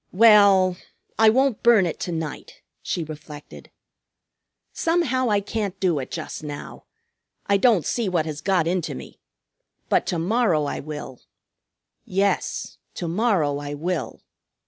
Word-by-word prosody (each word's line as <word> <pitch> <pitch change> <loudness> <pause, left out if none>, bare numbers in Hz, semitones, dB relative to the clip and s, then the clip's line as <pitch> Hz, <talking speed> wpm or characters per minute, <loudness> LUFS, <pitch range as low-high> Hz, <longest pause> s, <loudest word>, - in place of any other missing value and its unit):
"Well, 200 -3 +6 0.4
I 220 -1 +7
won't 260 0 +2
burn 230 -5 +5
it 165 - -4
to 175 - -4
night," 160 -3 -6 0.2
she 170 - -3
reflected. 150 -1 -11 1.0
"Somehow, 285 -8 +1
I 205 -1 +2
can't 200 -2 -4
do 175 -6 +1
it 130 - -6
just 160 -1 -6
now. 145 -1 -8 0.6
I 200 - +3
don't 210 - +3
see 230 -5 -1
what 170 -4 0
has 150 -2 -5
got 185 -4 +1
into 175 0 -1
me! - - -11 0.7
But - - +2
to 175 - -1
morrow 180 -2 +1
I 140 - -3
will. 145 -4 -8 0.8
Yes, 195 +2 -1 0.2
to 175 - -4
morrow 170 -7 +1
I 145 0 -5
will." 170 +3 -4
185 Hz, 140 wpm, -23 LUFS, 155-215 Hz, 1.0 s, I